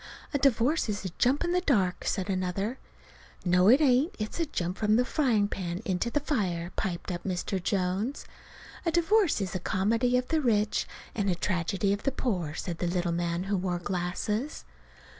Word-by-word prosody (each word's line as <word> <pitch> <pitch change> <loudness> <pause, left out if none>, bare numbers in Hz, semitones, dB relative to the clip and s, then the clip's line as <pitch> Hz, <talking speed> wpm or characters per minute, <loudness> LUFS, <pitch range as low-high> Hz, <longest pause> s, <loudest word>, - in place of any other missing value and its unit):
"A 285 - +1
divorce 270 +1 +2
is 205 -1 -3
a - - -1
jump 265 +6 +3
in 345 - 0
the 360 +1 +2
dark," 200 - +1
said 190 -3 -1
another. 195 +5 -2 0.7
"No, 180 +2 +5
it 260 +5 +7
ain't. 275 +3 +3
It's 215 +8 -4
a 330 - +1
jump 180 - -3
from 215 0 +3
the 245 +2 +3
frying 240 -9 +2
pan 180 -3 -4
into 190 +4 0
the 295 - +1
fire," 185 - -1
piped 180 -1 -3
up 175 - -4
Mr. 185 0 -2
Jones. 195 - -1 0.6
"A 335 - +1
divorce 345 - +3
is 190 -2 -2
the 185 - -2
comedy 230 +8 +1
of 250 0 -2
the 320 -1 +2
rich 215 -5 +1 0.3
and 200 -2 0
the 180 - +2
tragedy 185 +2 0
of 200 - -3
the 275 - 0
poor," 180 - -2
said 175 -3 -5
a 175 - +1
little 175 0 0
man 170 +1 -1
who 200 +1 -1
wore 180 -1 -1
glasses. 185 - -3
200 Hz, 190 wpm, -28 LUFS, 180-250 Hz, 0.7 s, it